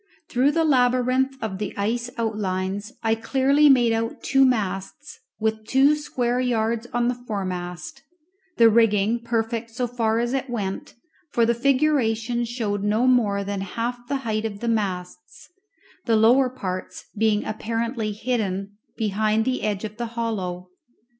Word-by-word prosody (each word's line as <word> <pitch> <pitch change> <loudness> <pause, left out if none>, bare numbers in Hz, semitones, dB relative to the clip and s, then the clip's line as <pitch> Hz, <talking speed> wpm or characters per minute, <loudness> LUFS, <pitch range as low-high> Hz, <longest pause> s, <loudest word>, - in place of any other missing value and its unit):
Through 265 +4 +2
the 330 - +2
labyrinth 255 -1 +2
of 190 -4 -4
the 210 -2 -4
ice 235 +4 -1
outlines 205 -1 -2
I 225 0 +3
clearly 270 +6 +3
made 240 -4 +5
out 225 0 -3
two 270 0 +4
masts, 215 +4 -2 0.2
with 220 0 -1
two 270 +4 +4
square 250 -5 -1
yards 235 -2 0
on 240 0 +1
the 245 - +1
foremast, 185 -3 -5 0.6
the 230 - +7
rigging 225 0 +3
perfect 230 0 -2
so 230 +2 -2
far 225 -2 0
as 240 +2 0
it 270 -1 -2
went, 200 -5 -4 0.3
for 235 -4 +2
the 235 - +3
figuration 240 -3 +1
showed 225 -4 -2
no 215 +4 +2
more 220 -6 +3
than 200 0 -3
half 240 +5 -4
the 280 - -1
height 215 -1 -1
of 210 -3 -4
the 235 - -4
masts, 205 - -3 0.6
the 230 - +4
lower 245 +4 +5
parts 185 -7 -6
being 215 -1 +1
apparently 225 +1 -2
hidden 205 -3 -2 0.2
behind 215 +1 +1
the 260 0 -1
edge 210 -1 -2
of 215 0 -6
the 240 0 -3
hollow. 185 -6 -3
225 Hz, 150 wpm, -24 LUFS, 210-245 Hz, 0.6 s, the